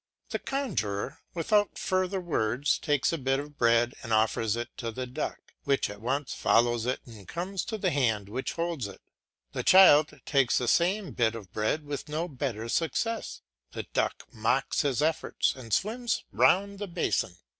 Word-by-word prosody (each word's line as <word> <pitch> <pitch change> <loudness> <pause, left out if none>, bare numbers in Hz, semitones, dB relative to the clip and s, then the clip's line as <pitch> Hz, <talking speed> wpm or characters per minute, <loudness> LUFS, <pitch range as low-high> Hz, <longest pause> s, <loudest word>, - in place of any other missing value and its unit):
The - - -1
conjuror, 185 - -2 0.2
without 205 +4 +2
further 185 0 0
words, 140 -6 0
takes 145 +1 +1
a 165 - -2
bit 135 0 +1
of 145 +1 -8
bread 115 0 +3
and 115 - -7
offers 110 0 +2
it 120 0 -5
to 115 - -3
the 130 +3 -4
duck, 125 - -4 0.2
which 140 -6 +1
at 105 0 -11
once 135 +4 -1
follows 120 0 +2
it 130 - -1
and 110 -5 -13
comes 185 +3 -3
to 220 - -3
the 190 -3 0
hand 110 -8 +1
which 125 +6 -3
holds 165 -9 -2
it. 100 - -11 0.5
The - - -3
child 155 -5 +6
takes 135 -4 +3
the 125 - 0
same 185 - +2
bit 115 -1 +1
of 100 -6 -10
bread 110 +8 -1
with 145 +1 -5
no 160 +3 -2
better 125 -7 -4
success; 220 - -1 0.3
the - - -4
duck - - 0
mocks - - +1
his 145 -2 0
efforts 160 0 0
and 125 -4 -10
swims 230 - 0
round 185 - +3
the 205 - -4
basin. 170 - -1
140 Hz, 175 wpm, -28 LUFS, 115-175 Hz, 0.5 s, child